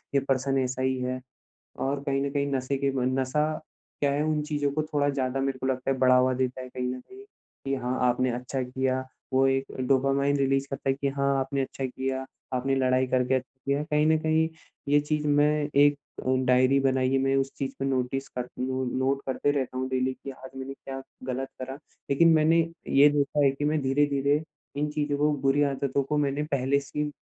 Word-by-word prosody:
ये - - +6
पर्सन 135 +1 +1
ऐसा 125 0 -3
ही 130 0 +1
है। 130 0 -2 0.7
और 140 0 -2
कहीं 135 0 +1
न - - -2
कहीं 140 0 0
नशे 135 +1 -1
के 140 0 +1
बन 130 +1 0
नशा 135 +4 +1 0.5
क्या 140 -1 +2
है 145 +1 0
उन 155 -1 0
चीज़ 150 -1 -2
को 155 - +1
थोड़ा 145 -1 +3
ज़्यादा 135 -1 -1
मेरे 135 -1 -1
को 130 - -3
लगता 130 0 -1
है, 135 - +1
बढ़ावा 130 0 +5
देता 130 0 -1
है 130 - -8
कहीं 125 0 -3
न 130 - -8
कहीं 390 - -14 0.4
कि 135 - +1
हाँ, 130 -1 -2
आपने 125 +1 +1
अच्छा 125 +2 -3
किया 130 +1 -1 0.3
वो 135 +1 +4
एक 135 0 +1 0.2
डोपामाइन 135 +1 +2
रिलीज़ 135 0 +1
करता 135 0 -4
है - - +2
कि 140 +1 -2
हाँ, 140 0 +1
आपने 135 +1 -2
अच्छा 135 0 -5
किया, 130 +1 -3 0.3
आपने 130 +2 +1
लड़ाई 130 0 +2
करके 130 0 +1
अच्छा 130 0 -4
किया। 140 +1 +1
कहीं 150 0 +2
न 160 - +5
कहीं 160 +1 +2 0.4
ये 145 +1 +5
चीज़ 150 0 -1
मैं 145 +1 +4 0.3
एक 145 0 +5 0.5
डायरी 130 +2 +4
बनाई 130 -1 +2
है, 135 - +3
मैं 135 0 +2
उस 135 0 0
चीज़ 135 - -2
पे - - 0
नोटिस 135 +1 -1
कर 125 0 -5
नो 130 0 -1
नोट 135 +1 0
करते 135 +2 0
रहता 130 -3 -2
हूँ 130 0 -2
डेली 130 0 0
कि 140 - -4
आज 130 0 -11
मैंने 135 +1 -5
क्या 135 -1 -8 0.2
ग़लत 130 +1 -3
करा। 130 +1 -5 0.4
लेकिन 165 +5 +5
मैंने 160 +2 +4 0.3
ये 140 +2 +7
देखा 145 0 +1
है 135 - +5
कि 140 +2 -4
मैं 150 +1 +1
धीरे-धीरे 140 +2 +2 0.3
इन 150 +1 0
चीज़ों 145 -1 -1
को, 150 +1 +3
बुरी 135 +1 +3
आदतों 140 0 0
को 150 +2 -1
मैंने 145 0 0
पहले 140 +1 +2
से 140 +1 -9
ही 150 0 0
135 Hz, 215 wpm, -27 LUFS, 130-145 Hz, 0.7 s, ये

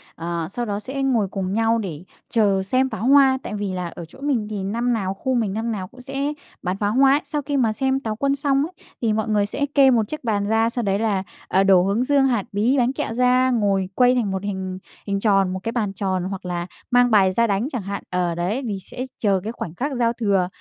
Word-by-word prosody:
ờ, 170 -1 -3
sau 240 +3 -3
đó 205 -2 -2
sẽ 265 +5 -4
ngồi 240 -7 +2
cùng 190 0 -3
nhau 225 +1 +2
để 175 -8 -5 0.3
chờ 200 -4 +2
xem 255 +7 +1
pháo 210 - -5
hoa. 270 -1 +6
Tại - - -5
vì 205 -2 -3
là 180 -1 -3
ở 170 0 -8
chỗ 165 - -17
mình 265 -7 0
thì 205 -3 -4
năm 235 +5 0
nào 195 -4 -1
khu 255 +6 -2
mình 220 -5 0
năm 225 +2 -2
nào 190 -4 -4
cũng 255 +6 -15
sẽ 275 +3 -2 0.3
bắn 185 +1 -2
pháo 205 +1 0
hoa 270 +2 +5
ấy. 290 - +2
Sau 295 - -2
khi 285 0 -2
mà 230 -5 +2
xem 265 +3 0
Táo 220 -5 -3
Quân 275 +5 +1
xong 280 0 +1
ấy, 345 - -9 0.3
thì 225 -3 +1
mọi 220 0 -1
người 210 -1 +2
sẽ 280 +7 -1
kê 275 -2 +7
một 225 -4 +2
chiếc 305 +3 -6
bàn 205 -3 0
ra, 225 +1 +2
sau 235 0 -3
đấy 195 -1 +1
là, 210 -4 0 0.2
à, 190 - +3
đổ 190 -2 +5
hướng 200 +6 +1
dương, 275 0 +3
hạt 240 -6 +1
bí, 225 +7 +2
bánh 250 0 +2
kẹo 225 - -3
ra, 250 +1 +3
ngồi 200 -5 +1
quây 250 0 +4
thành 225 -6 0
một 190 0 -3
hình 190 -2 -4 0.3
hình 200 0 0
tròn, 195 -3 +2
một 185 - -3
cái 230 - -2
bàn 215 -5 -1
tròn, 190 -2 -1
hoặc 190 0 -5
là 175 -1 -3 0.2
mang 245 0 +4
bài 195 -3 +5
ra 235 +5 +2
đánh 205 +4 0
chẳng 245 - -3
hạn. 200 +1 -5
Ờ, 180 -2 0
đấy 185 +9 -1
vì 210 -4 -2
sẽ 250 +6 -6
chờ 200 -3 +2
cái 220 - -3
khoảnh 175 -8 -6
khác 285 +9 -2
giao 235 -1 +1
thừa 200 -6 +1
215 Hz, 260 wpm, -22 LUFS, 195-250 Hz, 0.3 s, kê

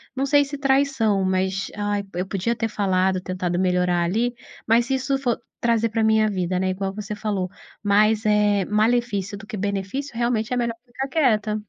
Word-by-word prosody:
não 270 - 0
sei 285 +1 +4
se 285 +1 -6
traição, 270 -7 +2
mas: 190 +1 -1
"Ai, 205 -1 -1
eu 180 +2 -2
podia 205 +5 -1
ter 225 0 -1
falado, 190 -2 +1
tentado 180 -1 -2
melhorar 180 -1 +2
ali", 230 +8 0 0.3
mas 230 +1 +4
se 270 - -2
isso 265 +1 0
for 250 -4 0 0.2
trazer 230 -1 +2
pra 225 0 0
minha 220 0 +3
vida, 185 -2 -1
né, 190 - 0
igual 195 +1 -2
você 210 0 -5
falou, 200 -4 -2 0.3
mais, 215 +1 +3
eh, 210 -2 +3
malefício 210 -2 0
do 210 - -12
que 220 - -6
benefício, 200 +7 -3
realmente 235 0 0
é - - 0
melhor 235 -1 -1
ficar 255 +2 -5
quieta. 215 -8 +1
210 Hz, 185 wpm, -23 LUFS, 190-240 Hz, 0.3 s, sei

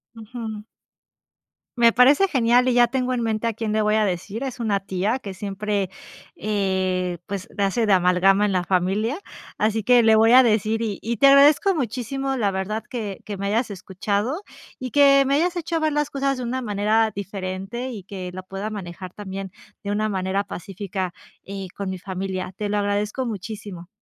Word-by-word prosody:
Ujú. 220 -1 -7 1.1
Me 235 -1 +5
parece 280 +10 +5
genial 245 -4 +3
y 255 - +3
ya 240 0 +5
tengo 255 +1 -1
en 245 - -1
mente 225 0 -1
a 230 - 0
quién 225 0 -3
le 215 0 +1
voy 210 0 +2
a 220 - +3
decir. 200 +5 -3
Es 260 -2 -5
una 210 -4 0
tía 195 +6 -1
que 200 -6 -7
siempre, 200 0 -2 0.5
eh, 190 -3 -1
pues, 195 -2 -5
hace 200 +3 +1
de 205 - +3
amalgama 185 +2 +4
en 205 - 0
la 180 -2 0
familia, 195 - 0 0.4
así 220 +1 +1
que 245 +2 +5
le 220 0 +6
voy 225 +1 +5
a 260 +1 +9
decir 220 -1 +1
y 215 -4 -2
y 235 +2 -2
te 275 - +6
agradezco 285 +8 +6
muchísimo 270 - -2
la 210 -6 +1
verdad 195 +3 -3
que 215 -6 -5
que 205 -1 -5
me 200 +1 -3
hayas 225 +4 0
escuchado 200 - -2 0.4
y 255 -1 -5
que 275 +1 +6
me 275 +1 +2
hayas 345 +4 +1
hecho 335 -1 -2
ver 310 -1 0
las 295 0 0
cosas 275 -1 -1
de 255 - -4
una 255 +2 -2
manera 215 0 +1
diferente 195 +4 -5
y 210 -5 -7
que 185 -1 -7
la 185 0 -7
pueda 195 +3 -5
manejar 185 -3 -7
también 195 -2 -6 0.3
de 200 - -3
una 215 +1 0
manera 190 0 -1
pacífica, 195 -1 -5 0.3
eh, 195 -1 -6
con 200 -1 -4
mi 190 -1 -5
familia, 190 0 -4
te 210 - -2
lo 205 +1 -1
agradezco 205 +5 -1
muchísimo. 205 -4 -6
210 Hz, 190 wpm, -23 LUFS, 195-240 Hz, 1.1 s, a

